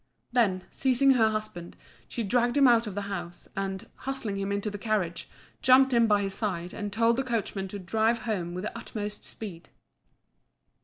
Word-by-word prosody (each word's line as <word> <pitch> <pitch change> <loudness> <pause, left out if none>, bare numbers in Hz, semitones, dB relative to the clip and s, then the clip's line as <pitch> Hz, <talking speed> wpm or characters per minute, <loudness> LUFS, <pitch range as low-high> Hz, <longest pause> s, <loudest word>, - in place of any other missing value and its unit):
Then, 205 -7 +2
seizing 270 +1 +3
her 225 -4 +4
husband, 215 -5 -5 0.3
she 235 - -3
dragged 240 +5 +2
him 275 -2 +7
out 235 -2 +4
of 200 - -6
the 205 - -2
house, 175 -3 -6
and, 195 -1 -3
hustling 240 -7 -3
him 195 0 -2
into 200 +1 -1
the 205 - -6
carriage, 195 -6 -1 0.3
jumped 260 +1 +6
in 235 -1 +5
by 205 -1 +3
his 195 -1 -1
side 185 -4 -2
and 205 -1 -4
told 230 +3 +3
the 270 - +1
coachman 215 -5 -2
to 205 - -6
drive 220 +5 +1
home 180 -7 -2
with 180 - -4
the 215 - -4
utmost 210 -2 -5
speed. 180 -6 -7
210 Hz, 185 wpm, -28 LUFS, 195-235 Hz, 0.3 s, him